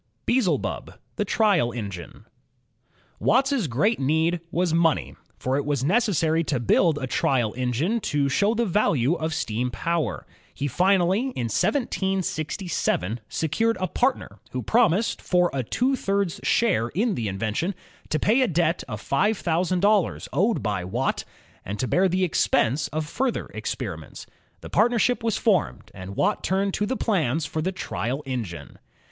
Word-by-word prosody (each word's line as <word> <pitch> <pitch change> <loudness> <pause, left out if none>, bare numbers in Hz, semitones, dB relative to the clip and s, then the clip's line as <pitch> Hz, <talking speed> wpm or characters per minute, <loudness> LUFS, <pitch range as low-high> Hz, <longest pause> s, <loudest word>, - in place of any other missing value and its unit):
Beelzebub, 240 -7 0 0.2
the - - 0
Trial 195 - +2
Engine 100 -7 -7 0.9
Watt's 260 - +2
great 155 - +1
need 160 +5 +1
was 175 -1 0
money, 165 -2 +1 0.2
for 130 +1 -1
it 145 - 0
was 145 -3 -1
necessary 165 - +2
to 135 -5 0
build 150 - +3
a 140 - -3
trial 125 -3 +1
engine 130 - 0
to 145 -8 0
show 200 - +2
the 235 +1 +1
value 165 - +2
of 160 -2 -2
steam 125 -5 -1
power. 165 +7 -2 0.3
He 140 - -2
finally, 185 - +3 0.2
in 120 -2 -2
1767, 185 - -1
secured 225 +9 0
a 185 - 0
partner 255 +9 -1
who 125 -1 -4
promised, 225 -2 +2
for 180 -1 +2
a 135 - 0
two 250 - 0
thirds 195 -6 -1
share 195 - +2
in 205 - 0
the 115 - -2
invention, 110 - -2 0.3
to 155 - +1
pay 225 +10 +3
a 255 - +3
debt 170 -2 +1
of 105 -5 -5
five 200 - +1
thousand 175 +1 0
dollars 205 -2 +2
owed 215 +5 +1
by 100 -4 -1
Watt, 90 - -2 0.4
and 100 +2 -5
to 125 - -1
bear 190 +7 +3
the 185 +1 +1
expense 140 -5 +1
of 155 +1 -3
further 255 - -2
experiments. - - -5 0.4
The - - -9
partnership 240 +2 +2
was 225 -2 0
formed, 195 -9 0
and 95 +1 -8
Watt - - +1
turned 195 +1 0
to 210 - -1
the 260 +3 -1
plans 160 - 0
for 155 +2 -3
the 185 +4 -1
trial 135 - -3
engine. 115 -10 -5
170 Hz, 155 wpm, -24 LUFS, 130-205 Hz, 0.9 s, build